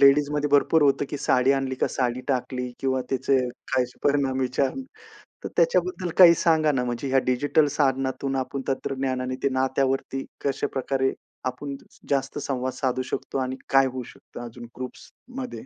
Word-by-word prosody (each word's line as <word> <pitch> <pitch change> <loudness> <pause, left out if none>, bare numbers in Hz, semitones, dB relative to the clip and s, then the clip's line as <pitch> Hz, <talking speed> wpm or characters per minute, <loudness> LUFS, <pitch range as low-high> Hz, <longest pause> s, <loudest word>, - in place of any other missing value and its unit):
लेडीजमध्ये 145 +1 +4
भरपूर 145 +2 +4
होतं 140 0 +3
की - - -2
साडी 130 0 +3
आणली 135 -1 -1
का 130 - 0
साडी 125 -1 -1
टाकली 125 -1 -1
किंवा 130 -1 +1
त्याचे 135 +1 +2 0.3
काहीच 125 -1 +1
परिणाम 140 -2 +1
विचार 130 +1 +1 0.7
तर - - -2
त्याच्याबद्दल 365 - +2
काही 175 -2 +10
सांगा 160 -3 +3
ना 125 -3 0
म्हणजे 120 +2 -3
ह्या 135 0 +3
डिजिटल 145 +4 +3
साधनातून 135 -1 0
आपण 135 +1 -3
तंत्रज्ञानाने 130 -1 -2
ते - - +3
नात्यावरती 135 0 0 0.2
कशा 140 -2 0
प्रकारे 135 0 0 0.3
आपण 140 +2 -4 0.3
जास्त 135 0 0
संवाद 130 -3 -2
साधू 130 0 -1
शकतो 130 - -4
आणि 130 0 -2
काय 135 0 +5
होऊ 130 0 -4
शकतं 120 - -10
अजून 120 +1 -10
ग्रुप्समध्ये? 245 - -8
135 Hz, 155 wpm, -25 LUFS, 130-140 Hz, 0.7 s, काही